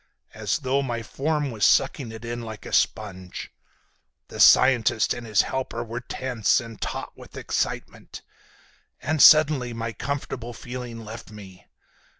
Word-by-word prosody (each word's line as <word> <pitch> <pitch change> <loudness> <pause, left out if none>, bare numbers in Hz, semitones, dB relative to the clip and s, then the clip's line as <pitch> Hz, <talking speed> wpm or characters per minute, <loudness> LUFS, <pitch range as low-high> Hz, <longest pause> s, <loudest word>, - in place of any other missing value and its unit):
As 105 -2 -1
though 135 -1 0
my 120 -4 -3
form 150 +2 -2
was 110 -3 -4
sucking 130 -7 +3
it 110 +1 -9
in 120 0 -4
like 110 -2 -8
a - - -8
sponge. 95 -3 -1 0.8
The - - -9
scientist 120 -4 +5
and 120 -1 -8
his 105 -2 +3
helper 130 -3 -3
were 115 +1 -5
tense 125 -3 0
and 115 -3 -10
taut - - -5
with - - -13
excitement. - - -4 0.8
And 150 +2 -1
suddenly 150 -6 +6
my 115 0 -4
comfortable 125 -2 -5
feeling 120 -1 -7
left 115 +2 -9
me. 95 -4 -13
120 Hz, 145 wpm, -25 LUFS, 110-130 Hz, 0.8 s, suddenly